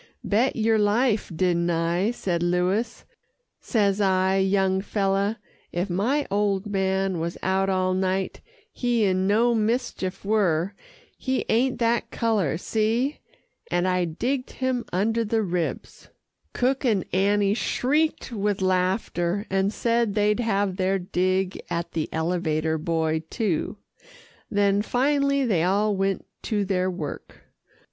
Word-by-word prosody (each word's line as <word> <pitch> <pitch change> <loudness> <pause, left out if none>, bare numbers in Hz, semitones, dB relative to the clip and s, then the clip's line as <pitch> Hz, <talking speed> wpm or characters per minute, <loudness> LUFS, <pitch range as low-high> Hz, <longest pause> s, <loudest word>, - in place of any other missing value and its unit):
"Bet 230 +6 +1
yer 225 -1 +2
life, 210 0 +2
didn't 175 0 +1
I," 170 +4 +1
said 180 -8 -2
Louis. 180 +6 0 0.6
"Says 205 -3 +1
I, 190 0 +2
'Young 190 0 +2
feller, 200 +1 0 0.3
if 180 +2 -2
my 250 +11 +1
old 200 -1 +1
man 190 -2 0
was 170 +1 -3
out 190 +1 +1
all 185 -1 +1
night, 190 0 -1 0.3
he 240 -3 0
in 190 -1 +1
no 230 +4 +3
mischief 220 -4 -1
were 195 -4 +1 0.5
he 260 -1 -1
ain't 250 +3 +2
that 235 0 +1
colour 210 -10 0
see!' 225 - 0 0.5
and 175 +1 +1
I 180 -1 +1
digged 250 - -2
him 260 -2 -1
under 225 +5 +1
the 220 0 0
ribs." 175 -7 -4 0.4
Cook 265 +3 0
and 215 -8 +1
Annie 200 +1 +3
shrieked 270 +9 0
with 205 -2 -1
laughter, 185 0 0
and 195 +1 +1
said 230 -2 0
they'd 210 +1 +2
have 200 -5 0
their 190 0 +1
dig 185 +1 -1
at 170 0 -3
the 160 -2 -2
elevator 160 -1 0
boy 160 -1 0
too, 210 -4 -1 0.7
then 200 0 +2
finally 280 +3 +1
they 195 -9 +2
all 200 +4 +2
went 195 0 -1 0.2
to 205 -3 -1
their 185 -1 0
work. 160 -6 -6
195 Hz, 130 wpm, -25 LUFS, 185-225 Hz, 0.7 s, no